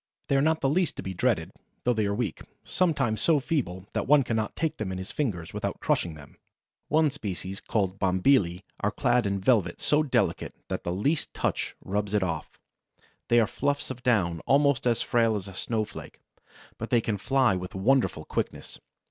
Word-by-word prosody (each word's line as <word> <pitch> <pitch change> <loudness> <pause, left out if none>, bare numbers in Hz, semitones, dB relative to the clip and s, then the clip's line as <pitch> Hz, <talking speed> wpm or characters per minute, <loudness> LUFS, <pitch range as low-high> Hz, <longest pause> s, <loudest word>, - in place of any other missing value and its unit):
They 140 - +3
are 135 - +4
not 160 +2 +2
the 135 - +2
least 165 +3 +1
to - - -6
be 95 - -4
dreaded, 95 -4 0 0.3
though 125 - +3
they 110 -3 0
are 100 - 0
weak, 105 -7 -2 0.2
sometimes 135 -11 0
so 160 -3 +4
feeble 115 - -2
that - - -1
one 145 0 +6
cannot 110 -3 -2
take 160 -1 -1
them 105 -3 -3
in 95 - -4
his 95 0 -6
fingers 100 - -2
without - - -3
crushing 85 -3 0
them. 75 -2 -14 0.5
One 155 -1 +3
species 95 -7 -5
called 95 -3 -1
Bombylii 95 -1 +2 0.2
are - - +1
clad 120 -3 +1
in 100 0 -1
velvet 95 -4 +2
so 150 +1 +2
delicate 150 -4 0
that - - -3
the 85 - -2
least 140 - -1
touch - - -1
rubs 105 +1 -1
it 100 - +2
off. 80 -4 -4 0.7
They 120 - +5
are 115 - +4
fluffs 145 +4 -2
of 125 -1 -7
down 95 -10 +2
almost 140 -2 +3
as 120 -2 +2
frail 115 -3 +2
as 100 -2 -4
a 95 - -9
snowflake, 110 +2 -4 0.6
but 115 - -4
they 120 - +4
can 110 -3 -2
fly 130 0 +3
with 90 0 -6
wonderful 105 - +2
quickness. - - -4
110 Hz, 190 wpm, -27 LUFS, 95-135 Hz, 0.7 s, one